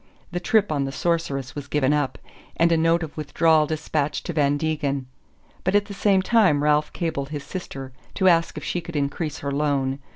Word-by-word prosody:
The 175 Hz, -, -2 dB
trip 210 Hz, +1 st, +2 dB
on 140 Hz, -2 st, 0 dB
the 135 Hz, -, -4 dB
Sorceress 135 Hz, -5 st, -1 dB
was 145 Hz, -2 st, -7 dB
given 145 Hz, -1 st, +2 dB
up, 145 Hz, -2 st, 0 dB, 0.4 s
and 170 Hz, 0 st, +4 dB
a -, -, +5 dB
note 165 Hz, +1 st, +2 dB
of 155 Hz, -, -7 dB
withdrawal 155 Hz, +1 st, +2 dB
despatched 150 Hz, -1 st, -2 dB
to 175 Hz, -, -3 dB
Van 145 Hz, -2 st, +2 dB
Degen; 145 Hz, -3 st, -1 dB, 0.6 s
but 185 Hz, +2 st, +1 dB
at 205 Hz, 0 st, +4 dB
the 200 Hz, -, -8 dB
same 195 Hz, -1 st, +2 dB
time 190 Hz, -11 st, +3 dB
Ralph 150 Hz, 0 st, +2 dB
cabled 155 Hz, -5 st, -3 dB
his 145 Hz, -2 st, -5 dB
sister 135 Hz, -8 st, -7 dB, 0.2 s
to 190 Hz, -, +2 dB
ask 165 Hz, -2 st, +3 dB
if -, -, -6 dB
she 175 Hz, -, -2 dB
could 170 Hz, 0 st, -9 dB
increase 145 Hz, +2 st, -2 dB
her 140 Hz, -, -1 dB
loan. 140 Hz, -2 st, 0 dB
150 Hz, 200 wpm, -24 LUFS, 140-170 Hz, 0.6 s, a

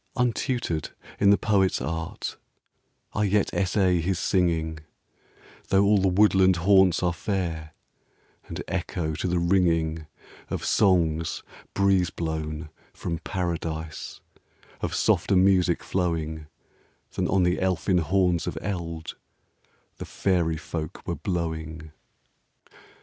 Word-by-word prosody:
Untutored 120 Hz, -, -1 dB, 0.3 s
in 100 Hz, -, +5 dB
the 100 Hz, -, +6 dB
poet's 100 Hz, -4 st, +2 dB
art, 80 Hz, +5 st, -4 dB, 0.8 s
I 105 Hz, -, 0 dB
yet 100 Hz, 0 st, +1 dB
essay 95 Hz, -2 st, +2 dB
his 90 Hz, +2 st, 0 dB
singing; 85 Hz, -3 st, 0 dB, 0.9 s
Though 95 Hz, +1 st, +4 dB
all 105 Hz, 0 st, +4 dB
the 95 Hz, -, +2 dB
woodland 95 Hz, -1 st, +4 dB
haunts 95 Hz, +1 st, +4 dB
are 90 Hz, -1 st, +2 dB
fair, 85 Hz, -4 st, -3 dB, 0.7 s
And -, -, -5 dB
echo 85 Hz, -3 st, -2 dB
to 85 Hz, -, -2 dB
the 90 Hz, 0 st, 0 dB
ringing 85 Hz, -3 st, +1 dB, 0.4 s
Of -, -, -3 dB
songs, 85 Hz, -5 st, +2 dB, 0.3 s
breeze 95 Hz, -3 st, +3 dB
blown 80 Hz, -1 st, -4 dB, 0.2 s
from 85 Hz, -1 st, -4 dB
Paradise, 80 Hz, -3 st, -4 dB, 0.6 s
Of -, -, -2 dB
softer -, -, +2 dB
music 90 Hz, -2 st, +3 dB
flowing 80 Hz, -4 st, -2 dB, 0.6 s
Than -, -, -1 dB
on 95 Hz, 0 st, +2 dB
the 90 Hz, 0 st, +1 dB
elfin 90 Hz, -1 st, +1 dB
horns 90 Hz, +1 st, +1 dB
of -, -, -3 dB
eld 85 Hz, -4 st, -5 dB, 0.8 s
The -, -, -6 dB
fairy 85 Hz, -4 st, 0 dB
folk 80 Hz, 0 st, -6 dB
were -, -, -1 dB
blowing. 80 Hz, -3 st, -4 dB
85 Hz, 115 wpm, -26 LUFS, 80-95 Hz, 0.9 s, the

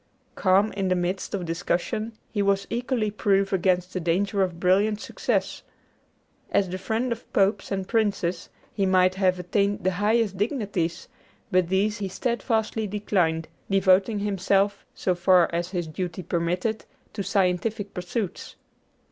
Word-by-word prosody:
Calm 195 Hz, +2 st, +3 dB
in 195 Hz, -1 st, -2 dB
the 185 Hz, -, +2 dB
midst 180 Hz, +3 st, -2 dB
of 185 Hz, -3 st, -3 dB
discussion, 180 Hz, +7 st, -2 dB, 0.2 s
he 210 Hz, -, 0 dB
was 195 Hz, 0 st, +2 dB
equally 240 Hz, -2 st, -1 dB
proof 195 Hz, -1 st, +1 dB
against 180 Hz, -1 st, +1 dB
the 185 Hz, -, -1 dB
danger 195 Hz, +4 st, 0 dB
of 180 Hz, -3 st, -1 dB
brilliant 200 Hz, +4 st, +3 dB
success. -, -, -2 dB, 0.9 s
As 195 Hz, -, +2 dB
the 185 Hz, +1 st, -4 dB
friend 225 Hz, +6 st, -1 dB
of 235 Hz, -, -5 dB
popes 195 Hz, 0 st, +2 dB
and 190 Hz, -1 st, -2 dB
princes, 195 Hz, -6 st, 0 dB, 0.2 s
he 195 Hz, -2 st, +1 dB
might 185 Hz, 0 st, +4 dB
have 185 Hz, -1 st, +2 dB
attained 200 Hz, +3 st, 0 dB
the 190 Hz, -, +2 dB
highest 205 Hz, +1 st, +1 dB
dignities; 205 Hz, -, -2 dB, 0.4 s
but 185 Hz, -2 st, +3 dB
these 205 Hz, +3 st, +1 dB
he 200 Hz, -, -2 dB
steadfastly 220 Hz, +1 st, -1 dB
declined, 180 Hz, -6 st, 0 dB, 0.2 s
devoting 195 Hz, +2 st, +3 dB
himself, 200 Hz, 0 st, 0 dB
so 185 Hz, -, 0 dB
far 180 Hz, 0 st, +4 dB
as 170 Hz, +1 st, -1 dB
his 175 Hz, -3 st, -2 dB
duty 175 Hz, +3 st, -5 dB
permitted, 180 Hz, +6 st, -1 dB, 0.3 s
to 210 Hz, -, -3 dB
scientific 200 Hz, +2 st, 0 dB
pursuits. 180 Hz, +2 st, -4 dB
195 Hz, 145 wpm, -25 LUFS, 180-210 Hz, 0.9 s, might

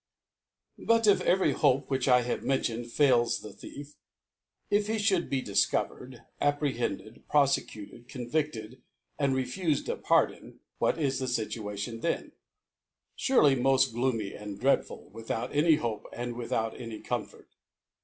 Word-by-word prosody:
PU 230 Hz, 0 st, +3 dB
T 215 Hz, -2 st, +5 dB
if -, -, +1 dB
every 185 Hz, +1 st, +3 dB
Hope 140 Hz, -2 st, +2 dB
^rhich 135 Hz, -1 st, 0 dB
I 125 Hz, -1 st, +5 dB
have 120 Hz, -, -2 dB
men 135 Hz, -, +1 dB
i -, -, -6 dB
tioned 120 Hz, 0 st, -3 dB
fails 120 Hz, -3 st, +3 dB
the 105 Hz, -2 st, -9 dB
Thief: 145 Hz, +1 st, -10 dB, 0.8 s
If 205 Hz, 0 st, +2 dB
iie 220 Hz, -, +1 dB
fhould 200 Hz, -5 st, +1 dB
difcovercd, 125 Hz, +1 st, -1 dB, 0.2 s
apprehended, 130 Hz, -7 st, -1 dB
profecutcd, 130 Hz, -5 st, 0 dB
cdnvifted, 125 Hz, -2 st, -3 dB, 0.4 s
and 140 Hz, -2 st, +2 dB
refufed 145 Hz, +5 st, -1 dB
a -, -, 0 dB
Pardon; -, -, 0 dB, 0.2 s
what -, -, +2 dB
is 140 Hz, -4 st, 0 dB
his 130 Hz, -2 st, -1 dB
Situation 110 Hz, 0 st, -4 dB
then? 170 Hz, -, -2 dB, 0.8 s
Surely 150 Hz, -, +4 dB
moft 130 Hz, -1 st, +3 dB
gloomy 115 Hz, -4 st, -1 dB
and 105 Hz, -1 st, -8 dB
dreadful, 135 Hz, +2 st, 0 dB
without 115 Hz, +4 st, -4 dB
any 155 Hz, +2 st, +5 dB
Hope, 115 Hz, -7 st, -4 dB
and 120 Hz, 0 st, -4 dB
with 120 Hz, -1 st, -6 dB
out 110 Hz, +1 st, -1 dB
any 115 Hz, -3 st, -7 dB
Comfort. -, -, -5 dB
130 Hz, 145 wpm, -29 LUFS, 115-145 Hz, 0.8 s, T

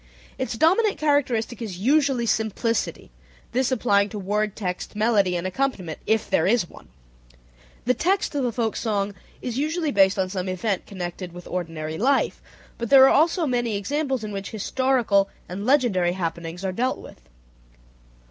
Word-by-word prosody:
Its -, -, -2 dB
dominant 385 Hz, -, +3 dB
characteristic 255 Hz, -6 st, 0 dB
is 205 Hz, -6 st, -5 dB
usually 270 Hz, +2 st, +2 dB
simplicity, 220 Hz, -, -1 dB, 0.4 s
this 260 Hz, +1 st, +1 dB
applying 205 Hz, -5 st, +2 dB
to 210 Hz, -, -6 dB
word 210 Hz, +1 st, -1 dB
text, 185 Hz, 0 st, -4 dB
melody, 210 Hz, -4 st, +2 dB
and 175 Hz, +1 st, -2 dB
accompaniment 185 Hz, -, -2 dB
(if 220 Hz, 0 st, +2 dB
there 160 Hz, -, +2 dB
is 215 Hz, -4 st, +2 dB
one). -, -, -15 dB, 1.0 s
The 250 Hz, -, +3 dB
text 370 Hz, +8 st, 0 dB
of 285 Hz, -2 st, 0 dB
the 245 Hz, -, 0 dB
folk 225 Hz, -2 st, -1 dB
song 205 Hz, -3 st, -1 dB, 0.3 s
is 245 Hz, 0 st, -3 dB
usually 310 Hz, +1 st, 0 dB
based 195 Hz, -1 st, +4 dB
on 190 Hz, -1 st, +1 dB
some 185 Hz, 0 st, -3 dB
event 185 Hz, +1 st, -2 dB
connected 180 Hz, -2 st, -6 dB
with 175 Hz, 0 st, -10 dB
ordinary 160 Hz, -3 st, -4 dB
life, 270 Hz, +5 st, +1 dB, 0.4 s
but 235 Hz, -1 st, -3 dB
there 270 Hz, -1 st, +9 dB
are -, -, +4 dB
also 330 Hz, +3 st, +3 dB
many 240 Hz, -5 st, 0 dB
examples 270 Hz, +3 st, -2 dB
in 215 Hz, -, -5 dB
which 195 Hz, -1 st, -5 dB
historical 225 Hz, -3 st, +1 dB, 0.2 s
and 200 Hz, +5 st, -5 dB
legendary 220 Hz, -11 st, +3 dB
happenings 170 Hz, 0 st, -4 dB
are 190 Hz, -, 0 dB
dealt 250 Hz, +7 st, -1 dB
with. -, -, -13 dB
220 Hz, 160 wpm, -24 LUFS, 190-260 Hz, 1.0 s, there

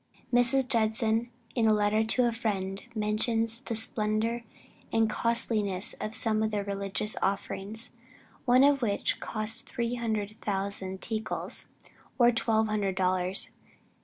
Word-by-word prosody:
Mrs. 255 Hz, +2 st, +3 dB
Judson 225 Hz, -1 st, +1 dB, 0.2 s
in 230 Hz, -3 st, +2 dB
a 215 Hz, -, +5 dB
letter 210 Hz, +1 st, +2 dB
to 240 Hz, +2 st, +2 dB
a -, -, +1 dB
friend, 195 Hz, -4 st, -3 dB
mentions 225 Hz, +2 st, 0 dB
the 240 Hz, -3 st, -4 dB
splendor 220 Hz, +1 st, 0 dB, 0.5 s
and 225 Hz, 0 st, +3 dB
costliness 215 Hz, -4 st, +3 dB
of 215 Hz, +1 st, -4 dB
some 220 Hz, -1 st, +1 dB
of 220 Hz, -, +1 dB
the 205 Hz, -1 st, -2 dB
religious 200 Hz, +1 st, -2 dB
offerings, 200 Hz, +3 st, -2 dB, 0.5 s
one 250 Hz, +2 st, +5 dB
of 280 Hz, -1 st, +4 dB
which 205 Hz, -4 st, 0 dB
cost 215 Hz, 0 st, 0 dB
three 235 Hz, 0 st, -2 dB, 0.5 s
thousand 195 Hz, -1 st, -2 dB
tickals, 220 Hz, -1 st, -2 dB, 0.5 s
or 240 Hz, -2 st, +6 dB
twelve 220 Hz, -1 st, +2 dB
hundred 205 Hz, -3 st, -1 dB
dollars. 185 Hz, 0 st, +2 dB
220 Hz, 130 wpm, -29 LUFS, 205-230 Hz, 0.5 s, or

